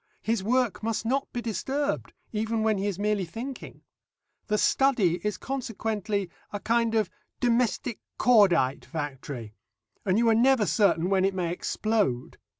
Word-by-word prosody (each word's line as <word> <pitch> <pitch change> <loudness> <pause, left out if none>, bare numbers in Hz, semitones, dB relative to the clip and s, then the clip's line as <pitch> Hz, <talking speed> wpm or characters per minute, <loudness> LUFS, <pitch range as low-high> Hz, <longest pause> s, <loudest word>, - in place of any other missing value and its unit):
His 225 -3 0
work 245 +1 +1
must 225 0 -2
not 270 +4 0
be 240 - -4
disturbed 270 +6 -2 0.2
even 220 +1 0
when 215 -2 +2
he 200 - -1
is 200 -4 -2
merely 205 -1 0
thinking. 230 +10 -7 0.6
The 210 - +1
study 220 -10 +3
is 210 -2 -1
consequently 220 -6 -2 0.2
a 205 - -4
kind 230 +1 +1
of 215 -5 +1 0.3
domestic 240 -1 +1 0.2
cordite 180 - +4
factory, 135 -7 -6 0.5
and 190 0 +2
you 235 +1 +3
are - - +5
never 240 0 +4
certain 195 -4 +2
when 190 -1 +3
it 195 0 +1
may 175 -3 -1
explode. 195 - -1
215 Hz, 150 wpm, -27 LUFS, 190-235 Hz, 0.6 s, are